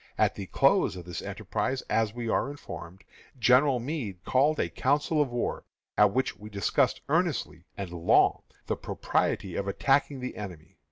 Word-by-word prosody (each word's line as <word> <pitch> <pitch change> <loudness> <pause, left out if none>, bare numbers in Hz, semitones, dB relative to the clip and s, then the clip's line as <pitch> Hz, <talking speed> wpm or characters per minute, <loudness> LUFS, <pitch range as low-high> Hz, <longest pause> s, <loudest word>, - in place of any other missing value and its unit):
At - - +3
the - - -7
close - - +3
of 90 -2 -8
this 90 - -5
enterprise, 110 +6 -3
as 110 -2 +1
we 120 +1 -5
are 120 - +1
informed, 95 -10 -9 0.3
General 125 +2 +4
Meade 115 - -4
called 145 +4 +3
a - - +1
council 145 +3 +1
of 145 - +1
war, 120 0 -2 0.3
at 105 -1 +5
which 130 +5 -1
was 105 +1 -10
discussed 100 -3 +1
earnestly - - 0
and 100 -3 -5
long 85 -1 +3 0.2
the - - -1
propriety 95 -3 -1
of 100 - -2
attacking 135 +6 +1
the 125 0 -5
enemy. 90 -4 -9
115 Hz, 165 wpm, -28 LUFS, 95-135 Hz, 0.3 s, at